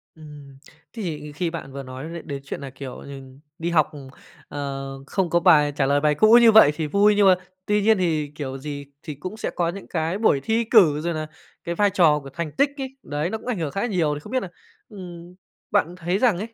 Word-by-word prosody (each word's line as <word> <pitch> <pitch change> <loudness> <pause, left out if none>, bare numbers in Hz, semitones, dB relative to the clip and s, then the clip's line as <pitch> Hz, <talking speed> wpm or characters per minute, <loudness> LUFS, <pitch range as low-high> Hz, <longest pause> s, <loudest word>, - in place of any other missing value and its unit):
Ừm, 145 -3 -13 0.4
thì 155 -9 -5
khi 170 +3 -2
bạn 165 -5 -7
vừa 140 0 -7
nói 130 +2 -8
đ 170 - -6
đến 140 -1 -5
chuyện - - -6
là, 140 - -6
kiểu 135 -1 -9
nh 135 -1 -11 0.2
đi 170 +1 -2
học, 155 -3 +3
ừm, 140 -3 -10 0.4
ờ, 135 -1 -5 0.2
không 190 -3 -1
có 170 +1 +3
bài 150 -5 +5
trả 140 -2 +1
lời 140 +1 +2
bài 150 0 +2
cũ 215 +8 +5
như 230 - +7
vậy 215 -9 +7
thì 155 -1 -2
vui, 205 +6 +4
nhưng 205 -1 +4
mà 185 - +7 0.3
tuy 210 0 +1
nhiên 220 +1 +4
thì 155 -5 -1
kiểu 135 -3 -5
gì 140 0 -7 0.2
thì 155 -3 -6
cũng 185 +9 -7
sẽ - - -3
có 170 -1 0
những 195 +2 -8
cái 165 +2 -2
buổi 150 -11 +2
thi 225 +5 +1
cử 180 -10 +4
rồi 170 +1 -2
là 155 -1 -4 0.4
cái 170 - -3
vai 205 +3 +3
trò 165 -6 +4
của 140 - -11
thành 155 +3 -5
tích 280 - +2
ấy, 265 -1 -6
đấy, 150 +3 -2
nó 220 - -3
cũng 225 - -14
ảnh 235 -8 -2
hưởng 155 -3 -2
khá 200 +8 -2
nhiều. 170 -9 0
Thì 145 - -6
không 210 - -12
biết 255 -1 0
là, - - -6 0.4
ừm, 180 -4 -10 0.4
bạn 175 +4 +1
thấy 180 +1 -1
rằng 220 -5 +3
ấy, 225 +4 -6
165 Hz, 245 wpm, -23 LUFS, 145-200 Hz, 0.4 s, như